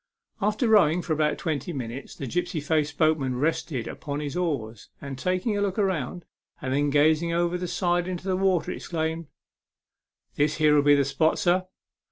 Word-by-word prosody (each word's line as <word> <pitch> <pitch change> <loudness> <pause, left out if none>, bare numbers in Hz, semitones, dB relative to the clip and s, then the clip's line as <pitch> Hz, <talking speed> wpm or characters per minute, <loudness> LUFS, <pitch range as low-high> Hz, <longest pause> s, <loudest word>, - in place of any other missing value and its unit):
After 210 +4 +1
rowing 180 -6 +4
for 160 - -1
about 150 0 +1
twenty 160 -1 -3
minutes, 130 -1 -6
the 140 - -6
gipsy 175 +5 -2
faced 150 -1 0
boatman 155 -5 +2
rested 140 -2 -1
upon 145 -1 -5
his 150 +1 -4
oars, 135 - -3
and, 140 -2 -6
taking 185 - -1
a 205 - 0
look 200 -1 -1
round, 180 -4 -1 0.3
and 130 -5 -3
then 145 +1 +2
gazing 155 +3 +3
over 175 +1 +1
the 180 0 -3
side 175 0 0
into 185 +1 -5
the 185 - +1
water, 185 -2 +1
he - - -5
exclaimed, 160 -1 -3 0.6
" - - -50
This 145 +1 +2
here'll 150 -2 +4
be 145 0 +5
the 140 -1 +2
spot, 140 +4 +1
sir." 185 +1 +1
160 Hz, 185 wpm, -26 LUFS, 145-180 Hz, 0.6 s, be